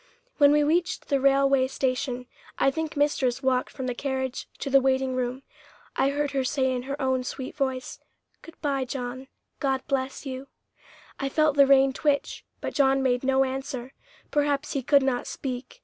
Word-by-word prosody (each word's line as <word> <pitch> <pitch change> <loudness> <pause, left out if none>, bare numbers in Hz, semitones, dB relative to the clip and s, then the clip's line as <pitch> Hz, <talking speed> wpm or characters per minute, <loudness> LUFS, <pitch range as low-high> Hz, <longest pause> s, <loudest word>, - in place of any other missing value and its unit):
When 285 -1 +6
we 295 0 +4
reached 345 +4 0
the 275 -2 +2
railway 275 -1 +4
station, 255 -1 -2 0.3
I 275 - +3
think 320 +1 -4
mistress 270 -3 +1
walked 255 -1 +1
from 265 - -6
the 250 - -1
carriage 265 0 -3
to 275 - -4
the 275 0 +6
waiting 265 0 +1
room. 255 +1 -2 0.5
I 270 - +2
heard 290 0 -1
her 270 -1 0
say 260 0 +1
in 250 - -2
her 280 +1 -3
own 260 -2 +1
sweet 260 0 -6
voice, 265 -3 -3 0.4
"Good 330 - -14
bye, 280 -3 0
John; 255 0 -5 0.3
God 265 -2 0
bless 270 +1 -2
you." 265 0 -6 0.7
I 275 - -1
felt 305 0 +2
the 280 -1 +6
rein 270 -1 +5
twitch, 285 0 0 0.2
but - - -4
John 270 -1 +3
made 250 -1 +1
no 265 0 +3
answer; 265 -1 -4 0.4
perhaps 290 0 0
he 275 - -1
could 280 +2 +4
not 255 -2 -1
speak. 265 - -6
270 Hz, 180 wpm, -26 LUFS, 260-280 Hz, 0.7 s, When